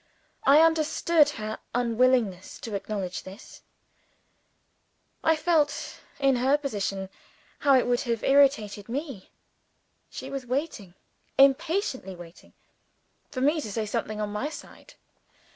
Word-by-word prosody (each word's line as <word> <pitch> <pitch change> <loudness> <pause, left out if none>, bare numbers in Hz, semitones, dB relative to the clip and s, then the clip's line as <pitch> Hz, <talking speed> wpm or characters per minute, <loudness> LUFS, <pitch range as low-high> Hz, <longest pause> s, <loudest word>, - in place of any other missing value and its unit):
I 285 +3 +8
understood 320 -1 +3
her 215 0 -5 0.2
unwillingness 235 -5 +1
to 225 - -6
acknowledge 195 -2 -4
this 190 +4 -12 1.6
I 320 - +4
felt 310 -2 0 0.2
(in 275 -2 +2
her 265 +4 +3
position) 200 -8 -3 0.5
how 280 -2 +4
it 255 - +2
would 245 0 +1
have 230 -3 -2
irritated 235 -7 +3
me. 270 - -5 0.8
She - - -8
was 270 -2 -5
waiting 250 - -3 0.4
impatiently 275 - +2
waiting 175 -1 -14 0.8
for 255 - -5
me 300 +4 +2
to 215 - -6
say 220 +1 -2
something 215 0 -3
on 210 -1 -2
my 255 +8 -2
side. 305 - -12
255 Hz, 120 wpm, -26 LUFS, 210-290 Hz, 1.6 s, I